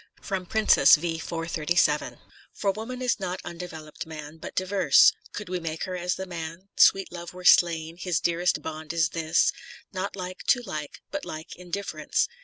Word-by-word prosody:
— - - -53
" - - -28 0.3
Princess," 220 -1 +6
v. 165 +1 -3
437. 165 -1 0 0.4
For 200 - +1
woman 240 +5 -6
is 250 - +1
not 185 -1 -3
undevelopt 160 -3 -8
man, 155 -1 -8
But - - -9
diverse: 185 -7 +5 0.2
could 205 - -6
we 180 0 -2
make 165 -1 -4
her 185 - -3
as 180 0 -1
the 190 - -5
man. 170 +1 -7
Sweet 195 0 +5
Love 175 0 -8
were 180 0 -10
slain: 165 -2 +4
his 180 -3 0
dearest 175 +1 +1
bond 155 0 -5
is 165 -3 +2
this, 160 0 +2 0.4
Not 190 +1 -3
like 185 -1 -6
to 245 -2 +4
like, 155 -8 -6
but 295 0 -3
like 155 0 -7
in 180 0 -13
difference. 200 - -1
175 Hz, 180 wpm, -26 LUFS, 160-185 Hz, 0.4 s, Princess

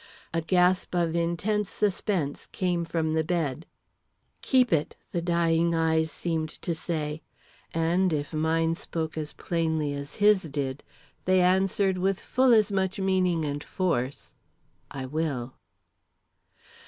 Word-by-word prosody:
A 165 - +1
gasp 180 +2 +2
of 170 -2 +1
intense 180 +5 0
suspense 190 -7 -1
came 175 -3 -1
from 165 -1 -1
the 160 0 +1
bed. 160 -3 -2 0.7
"Keep 255 -6 +3
it," 155 -2 0 0.2
the 170 - -1
dying 170 -1 +2
eyes 160 -1 +2
seemed 160 0 -2
to 170 - -4
say; 155 -2 -3 0.5
and 170 +3 +2
if 145 0 -2
mine 165 +1 +1
spoke 160 -1 -4
as 155 -1 -4
plainly 160 -3 -1
as 140 0 -7
his 205 -2 +5
did, 140 -1 -3 0.4
they 185 0 +4
answered 190 +1 +2
with 190 +1 +1
full 260 0 +2
as 215 -3 +5
much 190 -1 0
meaning 185 -4 +1
and 145 0 -3
force: 140 -8 -2 0.6
"I 135 -1 -5
will." 135 -3 -2
165 Hz, 130 wpm, -27 LUFS, 155-185 Hz, 0.7 s, his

